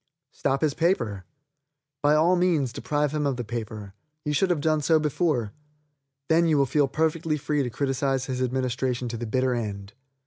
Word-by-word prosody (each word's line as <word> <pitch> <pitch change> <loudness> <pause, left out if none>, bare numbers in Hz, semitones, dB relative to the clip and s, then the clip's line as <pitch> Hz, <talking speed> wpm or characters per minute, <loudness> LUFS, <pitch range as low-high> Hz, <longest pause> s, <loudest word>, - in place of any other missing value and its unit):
Stop 135 0 -1
his 150 -3 +2
paper. 120 - 0 0.8
By 145 +1 +4
all 165 +4 +4
means 165 -9 +1
deprive 145 +4 -1
him 150 -1 0
of 135 -3 -1
the 125 - -3
paper. 110 -3 -6 0.3
You 150 - 0
should 185 +6 +2
have 175 -4 +1
done 155 +1 +1
so 160 +2 +4
before. 150 - 0 0.7
Then 165 +1 +4
you 155 -2 +3
will 140 - +4
feel 145 +1 +2
perfectly 160 +1 0
free 150 0 -1
to 125 - -1
criticise 135 +1 -1
his 130 -1 -3
administration 125 -1 -1
to 115 - -4
the 120 0 -4
bitter 130 +2 +1
end. 100 -4 -4
135 Hz, 180 wpm, -26 LUFS, 120-155 Hz, 0.8 s, By